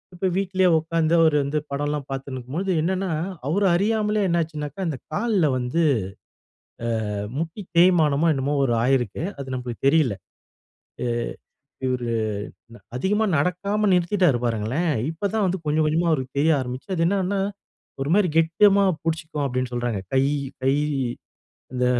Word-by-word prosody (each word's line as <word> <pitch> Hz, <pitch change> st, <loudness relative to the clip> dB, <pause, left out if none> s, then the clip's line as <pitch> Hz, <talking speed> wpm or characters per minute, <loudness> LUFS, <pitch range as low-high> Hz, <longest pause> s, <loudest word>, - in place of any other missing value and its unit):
இப்ப 190 Hz, +2 st, -1 dB
வீட்லே 190 Hz, -1 st, +2 dB
உட்கார்ந்து 160 Hz, 0 st, 0 dB
அவரு 160 Hz, -2 st, +4 dB
வந்து 145 Hz, +2 st, -1 dB
படம்லாம் 145 Hz, 0 st, -2 dB
பார்த்துன்னு 135 Hz, 0 st, -5 dB
இருக்கும்போது, 160 Hz, +11 st, -3 dB
என்னன்னா 190 Hz, +3 st, -1 dB, 0.4 s
அவர 200 Hz, +6 st, +1 dB
அறியாமலே 210 Hz, +2 st, +1 dB
என்ன 170 Hz, 0 st, +2 dB
ஆச்சுனாக்கா 150 Hz, +1 st, -6 dB
அந்த 155 Hz, -5 st, -2 dB, 0.2 s
கால்ல 205 Hz, -1 st, +1 dB
வந்து, 125 Hz, +7 st, 0 dB, 1.3 s
ஆ -, -, -3 dB, 0.2 s
முட்டி 165 Hz, +6 st, -4 dB, 0.2 s
தேய்மானமோ! 165 Hz, -3 st, +4 dB
என்னமோ! 140 Hz, +2 st, -1 dB
ஒரு 120 Hz, -, +1 dB
ஆகியிருக்கு. 125 Hz, -, 0 dB, 0.2 s
அது 135 Hz, -, -6 dB
நமக்கு 125 Hz, -2 st, -5 dB
தெரியல. 140 Hz, -8 st, +3 dB, 0.9 s
அ -, -, -1 dB, 0.8 s
இவரு 125 Hz, -2 st, -1 dB, 0.9 s
அதிகமா 205 Hz, +10 st, +1 dB
நடக்காம 200 Hz, +6 st, 0 dB
நிறுத்திட்டாரு 180 Hz, -5 st, +3 dB
பாருங்களேன். 120 Hz, +9 st, 0 dB, 0.2 s
இப்ப 165 Hz, +5 st, -2 dB
தான் 215 Hz, -2 st, +2 dB
வந்து 185 Hz, +1 st, -1 dB
கொஞ்சம், 155 Hz, +1 st, +1 dB
கொஞ்சமா 165 Hz, +3 st, +1 dB
அவருக்கு 130 Hz, -3 st, -3 dB
தெரிய 160 Hz, +3 st, +4 dB
ஆரம்பிச்சது. 130 Hz, +9 st, -5 dB
அது 165 Hz, -, +2 dB
என்னனா, 195 Hz, 0 st, 0 dB, 0.6 s
ஒருமாரி 180 Hz, +7 st, +2 dB
கெட்டியமா 195 Hz, +5 st, +4 dB, 0.2 s
பிடிச்சிக்குவோம் 160 Hz, -2 st, -2 dB
அப்பிடின்னு 125 Hz, -1 st, -2 dB
சொல்றாங்க. 120 Hz, -4 st, -1 dB, 0.2 s
கை 135 Hz, +1 st, +4 dB, 0.4 s
கை 135 Hz, +1 st, +3 dB, 1.0 s
இந்த 125 Hz, 0 st, +1 dB
160 Hz, 135 wpm, -23 LUFS, 135-185 Hz, 1.3 s, அவரு